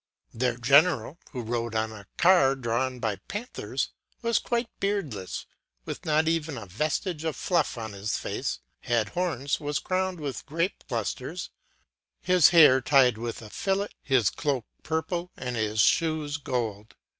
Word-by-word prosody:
2Their 120 0 0
general, 140 +2 +4
who 125 -4 -5
rode 115 0 -2
on 110 0 0
a 105 -3 -11
car 170 -7 +5
drawn 125 +1 -1
by 110 -4 -1
panthers, 230 +5 -3 0.3
was 230 -1 +3
quite 235 0 -1
beardless, 155 - -2 0.4
with - - -6
not 155 0 +2
even 160 -3 0
a 110 - -7
vestige 155 - -2
of 160 -2 -1
fluff 170 -8 0
on 110 -2 -5
his 100 +1 -2
face, - - -3 0.2
had 115 -3 0
horns, 160 - -1
was 145 -1 -1
crowned 185 -1 -1
with 145 -3 -4
grape 165 +5 -1
clusters, - - -3 0.7
his 180 -3 +5
hair 150 -6 +7
tied 130 -3 +4
with 115 0 -5
a 105 - -11
fillet, 195 +1 0
his 130 -8 +2
cloak 135 -6 -1 0.2
purple, 165 +2 -2
and 125 -1 -4
his 110 -1 -1
shoes 155 +1 +2
of 145 - -22
gold. 110 -4 -3
140 Hz, 155 wpm, -27 LUFS, 115-165 Hz, 0.7 s, hair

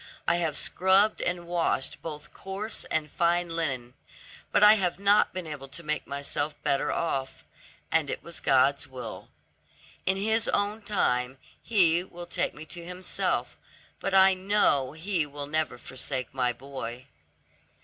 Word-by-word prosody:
I 170 - +3
have 165 -3 -1
scrubbed 190 +3 +3
and 175 0 -2
washed 170 -5 -1
both 150 -2 -8
coarse 200 +3 -4
and 155 -1 -1
fine 175 0 +1
linen, 135 -7 -2 0.6
but - - +4
I 210 +1 +10
have 185 -5 0
not 200 +2 +4
been 185 -2 -5
able 145 -3 -7
to 170 +5 -7
make 155 0 -2
myself 140 +1 -2
better 140 +1 +1
off; 135 -5 -2 0.5
and - - +2
it - - -4
was - - -8
God's - - +3
will. - - -8 0.8
In 190 +1 +3
His 220 +3 +1
own 205 +2 0
time 130 - 0 0.2
He 175 -6 +3
will 175 -1 -10
take 175 - -2
me 150 - -9
to 170 +1 -8
Himself, 180 +2 -2 0.4
but 195 - -1
I 190 0 +8
know 185 -9 +2
He 165 -1 -1
will 145 0 -6
never 155 +1 -1
forsake 130 -1 -5
my 125 -2 +1
boy." 125 -1 -7
170 Hz, 150 wpm, -28 LUFS, 140-190 Hz, 0.8 s, I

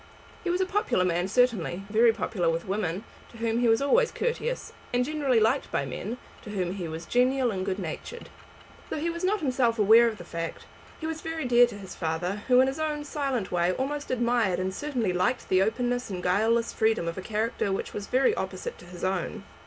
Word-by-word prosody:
He 360 - -2
was 355 +2 +1
a - - +3
popular 390 - +1
man 175 +1 +1
certainly, 195 -5 +1
very 225 +3 +5
popular 185 -6 -1
with 165 0 -1
women, 190 -1 -2 0.3
to 230 - -14
whom 230 0 0
he 245 - +3
was 225 +3 +4
always 470 +12 +4
courteous, 485 +1 -2 0.2
and 245 0 +2
generally 280 -5 +2
liked 225 +6 +1
by 140 - 0
men, 205 - -5 0.2
to - - -10
whom 185 -4 -2
he 185 -4 -4
was 160 +1 -6
genial 250 0 +2
and 190 -2 -2
good 190 -1 -2
natured. 195 - -6 0.6
Though - - -3
he 335 +3 -1
was 340 +2 -6
not 405 +3 +1
himself 250 -5 +1
aware 225 +3 +7
of 220 -2 -2
the 175 - -9
fact, 165 -1 -5 0.3
he 315 - -5
was 320 0 -3
very 325 -2 -3
dear 245 0 +6
to 220 - -8
his 190 -2 -9
father, 175 +4 -2
who 250 -1 +6
in 260 - +4
his 270 +3 -3
own 300 -1 -1
silent 275 -8 -2
way 175 0 +2
almost 285 +5 -3
admired 235 -6 +1
and 185 +1 -2
certainly 245 -6 -1
liked 185 +8 0
the 185 0 +4
openness 245 +3 0
and 180 -2 -5
guileless 225 +5 +2
freedom 220 -6 +1
of 170 +2 -3
a - - -5
character 215 0 -1
which 195 - -3
was 205 -1 -5
very 270 - +3
opposite 485 +1 -4
to - - -13
his 175 0 -10
own. 190 +2 -2
225 Hz, 215 wpm, -27 LUFS, 185-265 Hz, 0.6 s, aware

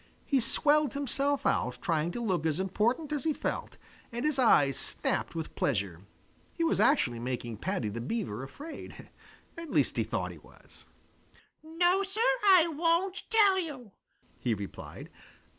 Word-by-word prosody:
He 275 - +2
swelled 295 +3 +2
himself 280 +1 -1
out - - +1
trying 165 -2 0
to 240 - -4
look 180 -7 0
as 155 +2 -1
important 230 - 0
as 295 -3 -1
he 315 - +1
felt, - - -4 0.3
and 240 +4 -3
his 300 -3 +1
eyes 145 - +5
snapped - - -2
with 160 -1 -5
pleasure. 100 -9 -1 0.5
He 335 - -1
was 330 - +1
actually 125 - +3
making 120 -2 -4
Paddy 180 - -2
the 110 +3 -4
Beaver 130 - -3
afraid. 285 - -9 0.5
At 335 -2 -8
least - - +1
he - - +2
thought - - -3
he - - -12
was. - - -19 0.8
"No, 350 +4 +2
Sir, 395 +2 -5 0.3
I 365 -4 +7
won't 335 +5 +1
tell 410 -4 +5
you," 270 - -6 0.5
he 120 -3 0
replied. 100 -1 -8
255 Hz, 155 wpm, -30 LUFS, -, 0.8 s, I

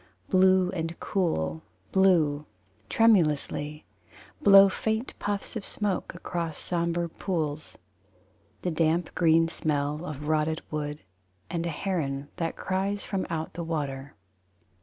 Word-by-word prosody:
Blue 185 -1 +5
and 165 -2 -4
cool: 80 - -1 0.3
Blue, 160 -6 +3 0.4
tremulously, 150 -8 +2 0.6
Blow 195 -5 +9
faint 220 +5 -2
puffs 205 +3 -3
of 220 - -3
smoke 200 -5 -2
Across 170 -3 -4
sombre 170 0 -1
pools. 155 -4 -3 0.9
The 180 - 0
damp 165 +2 +1
green 165 -1 +4
smell 150 -1 -1
of 150 -3 -6
rotted 155 0 +1
wood; 150 -1 -3 0.5
And 170 -1 -1
a - - -1
heron 150 -5 -2
that 165 -1 -2
cries 195 +2 -2
from 195 -2 -2
out 160 -2 -3
the 170 - -4
water. 145 -4 -4
165 Hz, 115 wpm, -27 LUFS, 150-185 Hz, 0.9 s, Blow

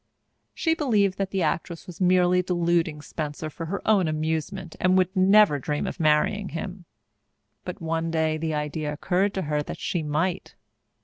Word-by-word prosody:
She 325 - +1
believed 210 - +1
that 195 -1 -1
the 190 -2 -1
actress 165 +1 -2
was 180 0 -10
merely 180 0 +4
deluding 170 -4 0
Spencer 155 0 -5
for 165 +2 -6
her 200 +5 -5
own 200 -5 +4
amusement 160 +3 -3
and 185 0 +3
would 185 +1 +1
never 195 -4 +5
dream 145 +2 -2
of - - -5
marrying 165 +6 +2
him. 180 +1 -6 0.8
But 180 - -6
one 165 0 -1
day 160 -1 0
the 160 -1 -2
idea 150 0 -3
occurred 185 +6 0
to 190 - -1
her 150 -1 -1
that - - -6
she 175 - -2
might. 160 +5 -2
170 Hz, 170 wpm, -25 LUFS, 155-190 Hz, 0.8 s, never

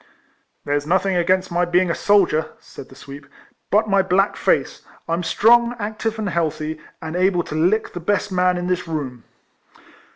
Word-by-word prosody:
There 145 - -1
's 145 - -11
nothing 190 +2 +1
against 185 +1 +1
my 175 +1 +1
being 175 0 +2
a - - 0
soldier," 175 -7 +2
said 130 - -13
the 130 - -15
sweep, 140 +1 -11 0.2
" - - -42
but 215 +2 +3
my 200 -1 +3
black 190 +2 +1
face; - - 0 0.3
I 165 - -1
'm 170 - 0
strong, 235 +6 +3
active, 220 +1 -4
and 215 -2 -3
healthy, 155 -2 -2 0.2
and 160 +1 -5
able 180 -1 +2
to - - -8
lick 180 +8 +1
the 175 - -5
best 200 +3 -1
man 180 -1 +2
in 175 - -3
this 180 -1 -2
room." 135 -7 -5
180 Hz, 190 wpm, -21 LUFS, 160-200 Hz, 0.3 s, but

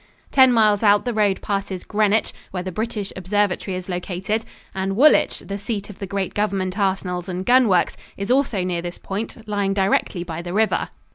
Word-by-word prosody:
Ten 260 -2 +6
miles 215 -3 +4
out 205 0 +4
the 245 - -1
road 205 -3 +1
passes 195 -2 -3
Greenwich, 215 0 +1 0.2
where 180 -1 -4
the 185 - -4
British 215 0 -3
observatory 190 0 -1
is 185 - -7
located, 185 +4 -2 0.3
and 190 0 -2
Woolwich, 300 +4 +4
the 200 0 -5
seat 205 -1 -4
of 195 - -15
the 195 - -5
great 195 0 -2
government 195 -2 -1
arsenals 190 -2 -1
and 185 +1 -4
gun 250 0 +5
works, 180 -4 +2 0.2
is 200 +3 -2
also 250 -8 +2
near 180 -2 -1
this 175 0 -6
point, 220 +2 -6
lying 200 -2 0
directly 190 -2 +1
by 170 -1 -5
the 175 0 -6
river. 220 +2 +1
200 Hz, 190 wpm, -22 LUFS, 185-215 Hz, 0.3 s, Ten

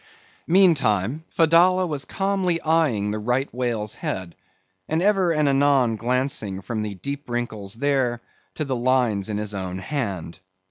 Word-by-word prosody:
Meantime, 150 - +3
Fedallah 175 +3 +4
was 145 -5 -3
calmly 195 -2 0
eyeing 150 -11 +1
the 110 - -3
right 125 +5 -1
whale's 115 -4 -2
head, 90 -3 -5 0.5
and 160 - +1
ever 190 -2 +3
and 150 -2 +2
anon 135 -4 +3
glancing 120 -4 -1
from 110 +2 -4
the 105 -2 -4
deep 140 +7 -6
wrinkles 110 -4 -2
there 130 -2 0 0.4
to 155 - -2
the 135 -2 -2
lines 120 -5 +1
in 105 - -2
his 105 0 -3
own 95 -2 -4
hand. 95 - -4
125 Hz, 145 wpm, -23 LUFS, 105-155 Hz, 0.5 s, Fedallah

